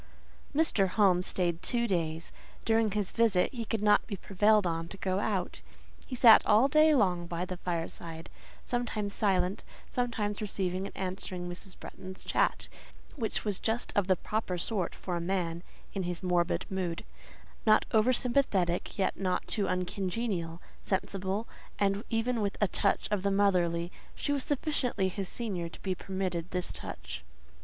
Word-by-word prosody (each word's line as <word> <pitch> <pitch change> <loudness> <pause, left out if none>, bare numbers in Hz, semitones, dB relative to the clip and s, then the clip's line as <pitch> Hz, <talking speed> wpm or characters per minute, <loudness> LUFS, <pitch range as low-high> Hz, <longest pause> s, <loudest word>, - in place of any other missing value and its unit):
Mr. 280 -11 +3
Home 185 -2 +4
stayed 175 -2 -1
two 235 -1 +1
days. 165 -4 -1 0.3
During 225 -1 +3
his 205 -1 -1
visit 225 -4 +3
he 235 -2 -3
could 220 -1 -2
not 210 0 +4
be 205 - -3
prevailed 205 +2 +3
on 165 -1 -1
to 195 - -9
go 190 0 0
out: 195 - -2 0.5
he 255 - -4
sat 235 -2 +8
all 220 +6 +5
day 305 +2 +5
long 180 -7 +2
by 170 +1 -2
the 185 0 -5
fireside, 165 -1 -4 0.4
sometimes 220 -4 -2
silent, 190 -2 +1 0.3
sometimes 220 -5 -1
receiving 190 -2 -1
and - - -12
answering 185 -1 -4
Mrs. 185 +2 -4
Bretton's 185 0 -9
chat, - - +1 0.5
which 225 -6 -2
was 205 -3 -1
just 225 +2 -1
of 205 -2 +2
the 190 - +4
proper 200 -1 -2
sort 185 0 -2
for 180 - -4
a - - -3
man 170 -2 -1 0.3
in 195 - -2
his 175 -1 -3
morbid 175 -1 +1
mood—not 190 +4 -1
over 220 +3 +4
sympathetic, 235 -9 +1
yet 195 - 0
not 185 -2 0
too 205 -3 0
uncongenial, 185 -1 -2 0.2
sensible; 195 +2 -1 0.3
and 200 +1 +1
even 230 +1 0
with 200 -1 -1
a 205 - +3
touch - - +1
of 205 -2 +1
the 200 - +1
motherly—she 180 - 0
was 280 -2 0
sufficiently 255 -9 0
his 195 0 -4
senior 190 -8 -3
to - - -12
be 190 - 0
permitted 185 -2 -3
this 180 -1 -2
touch. - - -7
195 Hz, 155 wpm, -30 LUFS, 180-220 Hz, 0.5 s, sat